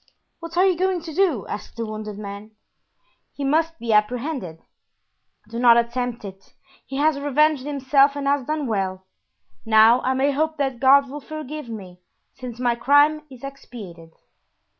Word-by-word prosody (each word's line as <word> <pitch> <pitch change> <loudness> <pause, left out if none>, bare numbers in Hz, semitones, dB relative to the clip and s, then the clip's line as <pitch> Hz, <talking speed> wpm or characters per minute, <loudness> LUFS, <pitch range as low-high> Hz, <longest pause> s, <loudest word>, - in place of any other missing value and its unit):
"What 335 0 -8
are 370 - +5
you 375 -2 +3
going 370 0 0
to 320 -1 -8
do?" 325 - +1
asked 210 - -8
the 230 - -3
wounded 215 -1 -6
man. 205 +1 -9 0.8
"He 285 - -6
must 325 +4 +1
be 230 -5 -2
apprehended." 215 - -1 0.9
"Do 230 +2 -6
not 240 -1 +6
attempt 235 -1 -2
it; 195 0 -12 0.3
he 270 - -7
has 295 0 +2
revenged 290 0 +1
himself 280 0 +3
and 285 -1 -4
has 280 -2 0
done 305 -1 -2
well. 190 -4 -2 0.6
Now 225 +2 +5
I 260 +1 0
may 275 +2 +2
hope 310 +3 -1
that 270 -4 -2
God 275 +1 +5
will 290 +3 -8
forgive 305 -2 -7
me, 190 -5 -9 0.3
since 250 -3 -9
my 245 -1 +2
crime 290 +5 +3
is 260 -2 -14
expiated." 205 -11 -10
260 Hz, 160 wpm, -22 LUFS, 225-295 Hz, 0.9 s, not